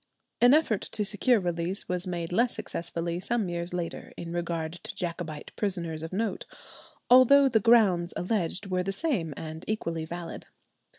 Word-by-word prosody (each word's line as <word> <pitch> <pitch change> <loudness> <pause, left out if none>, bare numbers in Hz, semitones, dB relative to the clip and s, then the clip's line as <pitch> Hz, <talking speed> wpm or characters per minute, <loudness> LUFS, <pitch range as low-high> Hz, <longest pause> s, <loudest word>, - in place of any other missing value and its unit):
An 245 +4 +7
effort 240 -10 +2
to 210 - 0
secure 215 +4 +3
release 175 +1 -2
was 180 +1 -2
made 170 -2 -3
less 235 +6 +2
successfully 170 -5 -3
some 215 0 -1
years 170 0 -3
later 175 -2 -5
in 170 0 -6
regard 170 -2 -2
to - - -7
Jacobite 170 -3 -5
prisoners 170 -6 -2
of 160 - -6
note, 205 0 -2 0.6
although 265 +3 +7
the 230 -4 +3
grounds 195 -6 +4
alleged 185 0 -1
were 185 -1 -1
the 195 +2 -2
same 195 - 0
and 160 +1 -7
equally 170 -7 -2
valid. 170 +1 -7
180 Hz, 160 wpm, -28 LUFS, 170-220 Hz, 0.6 s, An